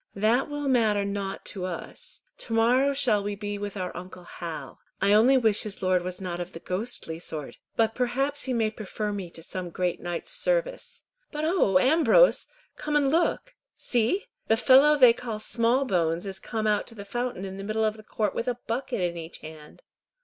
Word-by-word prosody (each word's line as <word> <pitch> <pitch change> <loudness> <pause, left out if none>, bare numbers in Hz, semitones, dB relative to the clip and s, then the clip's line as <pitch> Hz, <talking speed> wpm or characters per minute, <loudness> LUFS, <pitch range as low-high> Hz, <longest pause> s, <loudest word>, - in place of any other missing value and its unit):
"That 225 +8 +2
will 290 -1 -3
matter 220 -6 +3
nought 200 -1 -4
to 190 - -5
us. 180 -2 -6 0.2
To 230 - -5
morrow 245 +5 +4
shall 255 -7 +2
we 205 0 -3
be 205 0 -5
with 205 0 -5
our 185 -1 -4
uncle 180 0 -9
Hal. 170 -2 -7 0.2
I 200 +1 +3
only 240 +6 +6
wish 220 -4 +3
his 205 -2 -6
lord 185 -1 +3
was 180 0 -6
not 180 -2 -4
of 175 +1 -6
the 165 - -7
ghostly 185 -3 -3
sort, 155 -4 -5 0.2
but 225 -1 +2
perhaps 270 +4 -1
he 260 - -2
may 225 -2 +1
prefer 215 0 -4
me 195 -4 -5
to 165 -1 -8
some 180 +1 -4
great 180 +1 -1
knight's 175 -1 -4
service. - - -1 0.3
But 300 +1 -2
oh! 315 - +3
Ambrose, 320 - +5 0.3
come 300 0 -2
and 280 -2 +3
look. 345 +9 +1 0.2
See! 245 - 0 0.2
The 225 - +3
fellow 275 +5 +6
they 250 -4 +8
call 230 -2 -5
Smallbones 215 -8 +1
is 195 -1 -4
come 220 -2 -3
out 210 -1 +1
to 230 - -10
the 200 -2 -8
fountain 240 -2 -3
in 190 0 -7
the 195 - -6
middle 215 +2 0
of 215 0 0
the 215 - -12
court 210 -1 -2
with 235 - -3
a 245 -1 -1
bucket 245 -1 -2
in 175 -1 -1
each 165 0 -7
hand. 155 - -12
215 Hz, 200 wpm, -27 LUFS, 185-255 Hz, 0.3 s, they